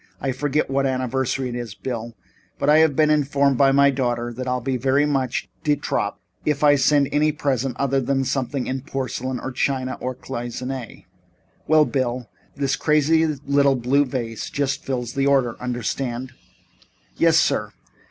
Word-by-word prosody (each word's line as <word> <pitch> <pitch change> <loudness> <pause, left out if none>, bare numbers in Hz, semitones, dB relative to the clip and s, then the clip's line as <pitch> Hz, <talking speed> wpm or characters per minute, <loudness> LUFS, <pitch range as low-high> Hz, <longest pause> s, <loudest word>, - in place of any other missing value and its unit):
I 135 - -1
forget 145 +3 0
what 135 0 +1
anniversary 130 0 -1
it - - -5
is, 120 -4 -5
Bill, 115 +1 -5 0.4
but 145 - +2
I 155 - +6
have 160 -3 +4
been 155 0 +4
informed 140 -2 +2
by 135 -1 +5
my 140 +1 +5
daughter 120 -3 -2
that 130 +2 -5
I'll 125 0 0
be 130 +2 -2
very 135 +3 +2
much 140 +1 -1 0.2
de 150 -2 +3
trop - - -2 0.2
if 150 -1 0
I 145 -1 +7
send 145 +1 +3
her - - -10
any 150 +1 +3
present 135 -4 -1
other 135 0 +1
than 135 +1 0
something 130 0 -2
in 130 0 -3
porcelain 130 -2 -4
or 130 - -5
China 130 0 -1
or 130 0 -3
Cloisonné 125 0 -6 0.6
well, 155 -1 +5
Bill, 125 -3 -2 0.3
this 135 -1 0
crazy 155 +2 +3 0.2
little 140 -1 +3
blue 130 +4 +2
vase 120 -4 -4
just 140 -1 -2
fills 125 -3 -3
the 135 0 +1
order. 135 -4 +2
Understand?" 125 +1 -3 0.9
"Yes, - - +4
sir. - - +1
135 Hz, 170 wpm, -22 LUFS, 125-140 Hz, 0.9 s, I